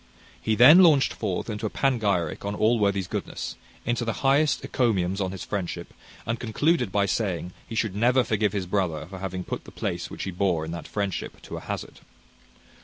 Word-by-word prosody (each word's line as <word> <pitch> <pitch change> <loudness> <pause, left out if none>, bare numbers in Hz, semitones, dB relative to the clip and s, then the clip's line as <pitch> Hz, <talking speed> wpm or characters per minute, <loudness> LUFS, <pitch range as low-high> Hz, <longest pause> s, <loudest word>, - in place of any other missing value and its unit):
He 110 - +1
then 135 +10 +9
launched 155 -7 +5
forth 100 -5 -3
into 110 -1 -3
a - - -4
panegyric 100 - 0
on 100 0 -2
Allworthy's 100 -4 +2
goodness; - - -4 0.3
into 120 0 0
the 115 +3 -3
highest 140 +2 +3
encomiums 95 -6 +1
on 95 -1 -1
his 95 - -6
friendship; 90 -3 -4 0.3
and 115 0 -2
concluded 125 - +1
by 100 0 +2
saying, 90 -2 -2
he 115 - -6
should 110 -3 0
never 125 +4 +4
forgive 110 -3 +1
his 95 -2 -2
brother 90 -5 -1
for 95 +2 -9
having 95 -1 -4
put - - -5
the - - -11
place - - -3
which - - -6
he 95 - -3
bore 90 -3 0
in 80 - -6
that 85 -1 -6
friendship 100 -3 -3
to - - -7
a - - -6
hazard. - - -6
100 Hz, 190 wpm, -26 LUFS, 95-115 Hz, 0.3 s, then